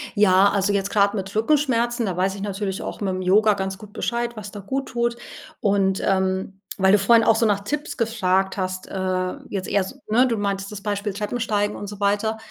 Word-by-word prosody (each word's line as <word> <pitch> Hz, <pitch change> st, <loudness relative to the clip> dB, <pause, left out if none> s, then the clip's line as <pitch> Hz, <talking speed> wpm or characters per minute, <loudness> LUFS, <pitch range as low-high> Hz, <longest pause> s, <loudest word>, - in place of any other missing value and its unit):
Ja, 200 Hz, -1 st, +5 dB
also, 200 Hz, 0 st, +1 dB
jetzt 200 Hz, 0 st, 0 dB
grad 200 Hz, -1 st, +3 dB
mit 195 Hz, 0 st, -5 dB
Rückenschmerzen, 240 Hz, -1 st, +1 dB
da 190 Hz, -4 st, -2 dB
weiß 190 Hz, +2 st, 0 dB
ich 200 Hz, -, -8 dB
natürlich 195 Hz, -1 st, -3 dB
auch -, -, -6 dB
mit'm 190 Hz, -2 st, -1 dB
Yoga 210 Hz, +4 st, +4 dB
ganz 190 Hz, -1 st, -3 dB
gut 210 Hz, -1 st, -13 dB
Bescheid 235 Hz, 0 st, -2 dB
was 205 Hz, -2 st, -8 dB
da 205 Hz, -, -8 dB
gut 265 Hz, +7 st, -3 dB
tut 235 Hz, -1 st, 0 dB, 0.4 s
und, 195 Hz, -2 st, +1 dB
ähm, 190 Hz, 0 st, 0 dB, 0.2 s
weil 190 Hz, 0 st, +4 dB
du 205 Hz, -, +6 dB
vorhin 225 Hz, +3 st, +5 dB
auch 225 Hz, -, +4 dB
so 225 Hz, -, +2 dB
nach 205 Hz, -2 st, +2 dB
Tipps 295 Hz, +8 st, -4 dB
gefragt 195 Hz, -5 st, 0 dB
hast, 185 Hz, -1 st, -3 dB
äh, 185 Hz, -1 st, -2 dB, 0.2 s
jetzt 195 Hz, -2 st, -4 dB
eher 200 Hz, -, +2 dB
so 190 Hz, -, -8 dB
ne, 245 Hz, +5 st, +4 dB
du 230 Hz, -3 st, -1 dB
meintest 200 Hz, -1 st, -2 dB
das 205 Hz, -1 st, -7 dB
Beispiel 205 Hz, 0 st, -2 dB
Treppensteigen 210 Hz, 0 st, -1 dB
und 205 Hz, -, -6 dB
so 205 Hz, 0 st, -8 dB
weiter, 205 Hz, +2 st, +1 dB
205 Hz, 210 wpm, -23 LUFS, 190-220 Hz, 0.4 s, du